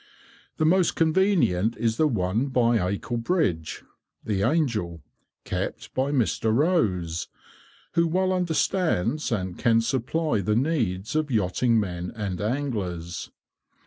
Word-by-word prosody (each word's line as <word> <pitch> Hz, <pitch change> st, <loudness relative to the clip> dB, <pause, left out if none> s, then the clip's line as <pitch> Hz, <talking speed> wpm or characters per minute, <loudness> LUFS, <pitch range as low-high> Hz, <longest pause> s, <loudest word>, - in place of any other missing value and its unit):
The 155 Hz, -, +1 dB
most 180 Hz, +1 st, +3 dB
convenient 160 Hz, -, +2 dB
is 115 Hz, -1 st, 0 dB
the 155 Hz, -, +4 dB
one 110 Hz, +1 st, 0 dB
by 120 Hz, -3 st, +2 dB
Acle 100 Hz, +6 st, -2 dB
bridge 105 Hz, -, -1 dB, 0.4 s
(the 100 Hz, -3 st, -1 dB
"Angel"), 105 Hz, -, 0 dB, 0.4 s
kept -, -, -4 dB
by 130 Hz, +2 st, 0 dB
Mr. 115 Hz, -4 st, +1 dB
Rose, 110 Hz, -, +1 dB, 0.7 s
who 170 Hz, 0 st, +3 dB
well 185 Hz, +3 st, +1 dB
understands 165 Hz, -, 0 dB
and 95 Hz, -5 st, -2 dB
can 115 Hz, -1 st, +4 dB
supply 125 Hz, +1 st, 0 dB
the 105 Hz, +3 st, 0 dB
needs 115 Hz, -, -1 dB
of 155 Hz, -1 st, +1 dB
yachting 115 Hz, +1 st, +2 dB
men 90 Hz, -3 st, -3 dB
and 100 Hz, -5 st, -4 dB
anglers. 105 Hz, -9 st, -3 dB
115 Hz, 120 wpm, -25 LUFS, 95-155 Hz, 0.7 s, the